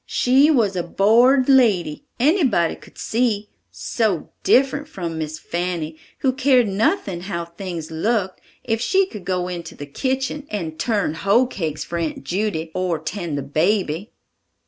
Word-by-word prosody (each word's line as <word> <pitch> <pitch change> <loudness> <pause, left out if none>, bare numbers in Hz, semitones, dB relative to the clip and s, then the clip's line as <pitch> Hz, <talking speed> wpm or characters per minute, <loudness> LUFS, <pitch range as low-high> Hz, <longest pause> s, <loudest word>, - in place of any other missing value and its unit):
She 265 +4 +4
was 225 -10 +2
a 180 - 0
born'd 235 +9 +4
lady, 215 - +3
anybody 260 - +3
could - - -18
see; 220 -3 0 0.2
so 210 -9 -2
different 275 +3 +3
from 170 - -5
Miss 155 0 -4
Fanny, 170 -2 -3 0.3
who 260 -2 +2
cared 255 -3 +3
nothing 195 - 0
how 175 -2 -4
things 170 -2 -7
looked 190 +3 -1 0.2
if 225 -1 -1
she 380 +8 +3
could 210 - -10
go 180 -1 -1
into 170 -2 -6
the 145 - -7
kitchen 265 - -2
and 165 -7 -4
turn 205 -9 0
hoe 200 +9 +3
cakes 165 - -4
for 170 - -4
Aunt 160 -4 -3
Judy, 175 -2 -2
or 180 -3 0
tend 160 -1 -4
the 140 - -3
baby!" 170 - 0
195 Hz, 150 wpm, -21 LUFS, 170-245 Hz, 0.3 s, She